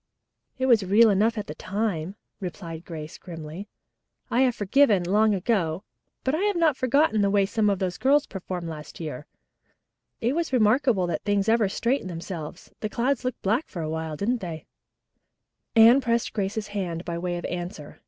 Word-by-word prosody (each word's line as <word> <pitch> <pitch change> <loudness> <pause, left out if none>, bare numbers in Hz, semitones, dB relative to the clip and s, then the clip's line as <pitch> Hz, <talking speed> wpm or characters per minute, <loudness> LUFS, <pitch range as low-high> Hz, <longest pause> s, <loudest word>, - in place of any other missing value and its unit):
"It 260 - 0
was 235 -5 +5
real 210 +4 +5
enough 210 +3 +2
then," 200 -4 -3 0.2
replied 170 -3 -7
Grace 155 -1 -8
grimly. 165 +2 -8 0.6
"I 245 - +3
have 255 -3 +3
forgiven, 205 -2 +3
long 210 +4 +3
ago, 185 -4 0 0.4
but 265 - 0
I 310 - +1
have 410 0 +1
not 325 -4 +3
forgotten 260 -3 +2
the 200 - +3
way 200 0 +3
some 210 +1 +1
of 200 - +1
those 185 -2 -3
girls 285 +3 +4
performed 180 -3 -6
last 155 -2 -8
year. 150 -4 -6 0.9
It 240 +3 0
was 335 -3 -1
remarkable 230 -3 +3
that 170 -3 -2
things 205 0 0
ever 220 -3 +3
straightened 235 0 -1
themselves. 165 -2 -7
The 215 - -3
clouds 255 +4 0
looked 255 -1 -4
black 225 +10 +1
for 170 -4 -5
a 155 - -3
while, 160 -1 -4
didn't 235 +6 0
they?" 165 -4 -6 1.1
Anne 230 +4 +8
pressed 235 -2 0
Grace's 210 +1 -2
hand 180 -4 -4
by 170 -1 -3
way 175 0 -2
of 175 - -6
answer. 175 -4 -6
200 Hz, 175 wpm, -25 LUFS, 175-235 Hz, 1.1 s, Anne